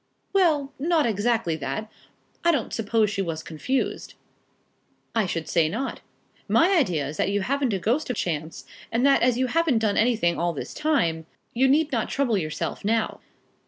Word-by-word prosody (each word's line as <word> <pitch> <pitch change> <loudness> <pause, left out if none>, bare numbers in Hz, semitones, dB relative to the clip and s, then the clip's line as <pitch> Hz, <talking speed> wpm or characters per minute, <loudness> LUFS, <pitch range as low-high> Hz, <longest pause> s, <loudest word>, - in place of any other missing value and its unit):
"Well, 310 -8 +2
not 320 +1 +2
exactly 220 -5 0
that. 140 +8 -4 0.6
I 340 - +5
don't 280 -9 -2
suppose 220 -1 +1
she 195 - -1
was 165 -4 -3
confused." 255 - -3 1.0
"I 220 -4 +1
should 165 -2 -3
say 165 -3 +2
not. 240 +10 -4 0.5
My 370 +4 +4
idea 175 - +1
is 150 +2 -7
that - - +1
you 200 0 0
haven't 270 +3 0
a - - +1
ghost 240 - 0
of 250 - -1
chance, 160 -6 -3 0.3
and 235 +3 +1
that 280 0 +5
as 245 0 +3
you 260 - +2
haven't 315 -1 +2
done 220 -2 +1
anything 215 -7 +2
all 175 0 0
this 145 - -6
time, 170 - 0 0.3
you 260 +3 +3
need 295 +3 +3
not 230 -4 -1
trouble 260 -5 +1
yourself 155 -5 -3
now." 220 +2 0
225 Hz, 175 wpm, -25 LUFS, 175-275 Hz, 1.0 s, I